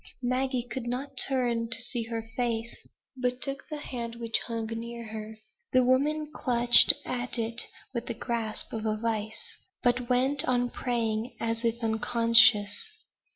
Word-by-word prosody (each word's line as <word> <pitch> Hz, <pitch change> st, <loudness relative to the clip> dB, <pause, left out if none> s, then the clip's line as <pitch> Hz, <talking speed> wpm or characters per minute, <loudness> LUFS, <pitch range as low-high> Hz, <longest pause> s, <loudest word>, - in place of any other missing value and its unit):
Maggie 255 Hz, 0 st, 0 dB
could 250 Hz, -1 st, -5 dB
not 255 Hz, +4 st, -4 dB
turn 240 Hz, -4 st, +1 dB
to 230 Hz, 0 st, +2 dB
see 240 Hz, 0 st, -2 dB
her 225 Hz, -1 st, -5 dB
face, 235 Hz, -2 st, -3 dB, 0.3 s
but 250 Hz, -1 st, -1 dB
took 275 Hz, +1 st, -2 dB
the 305 Hz, -, -4 dB
hand 235 Hz, -5 st, -6 dB
which 230 Hz, -1 st, -2 dB
hung 230 Hz, -2 st, -3 dB
near 235 Hz, +1 st, -6 dB
her. 220 Hz, 0 st, -7 dB, 0.4 s
The 255 Hz, 0 st, +5 dB
woman 295 Hz, +4 st, +1 dB
clutched 240 Hz, -3 st, +5 dB
at 245 Hz, 0 st, -2 dB
it 230 Hz, +1 st, +3 dB, 0.3 s
with 235 Hz, -1 st, -4 dB
the 235 Hz, -, -3 dB
grasp 230 Hz, -3 st, -3 dB
of 220 Hz, -1 st, -3 dB
a 215 Hz, 0 st, 0 dB
vice; 220 Hz, -1 st, -3 dB, 0.3 s
but 245 Hz, 0 st, +1 dB
went 265 Hz, +3 st, +4 dB
on 245 Hz, -1 st, +1 dB
praying, 230 Hz, -1 st, -2 dB
as 230 Hz, 0 st, -2 dB
if 235 Hz, +1 st, -1 dB
unconscious. 225 Hz, -, +4 dB
235 Hz, 155 wpm, -28 LUFS, 230-250 Hz, 0.4 s, The